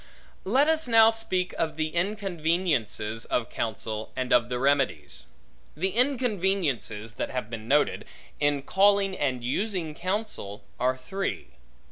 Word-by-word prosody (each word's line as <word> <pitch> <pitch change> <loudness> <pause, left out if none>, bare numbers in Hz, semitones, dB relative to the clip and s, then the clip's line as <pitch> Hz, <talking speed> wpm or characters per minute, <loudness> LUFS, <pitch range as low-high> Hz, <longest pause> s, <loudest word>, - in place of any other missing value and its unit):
Let 260 +9 +3
us 320 -3 +2
now 225 -1 +7
speak 190 -5 0
of 160 -2 0
the 155 0 0
inconveniences 170 - -1
of 120 -1 -1
counsel, 110 -1 -3
and 130 0 0
of 120 0 +4
the 125 - -1
remedies. 130 - 0 0.5
The 185 +5 +1
inconveniences 190 - 0
that - - -2
have 125 -4 -4
been 110 -1 -6
noted, 145 +3 +2 0.3
in 145 -1 +1
calling 195 +3 +3
and 130 -6 -1
using 175 - -1
counsel, 185 - -4 0.2
are 130 +1 +1
three. 190 +10 -4
155 Hz, 130 wpm, -27 LUFS, 125-195 Hz, 0.5 s, now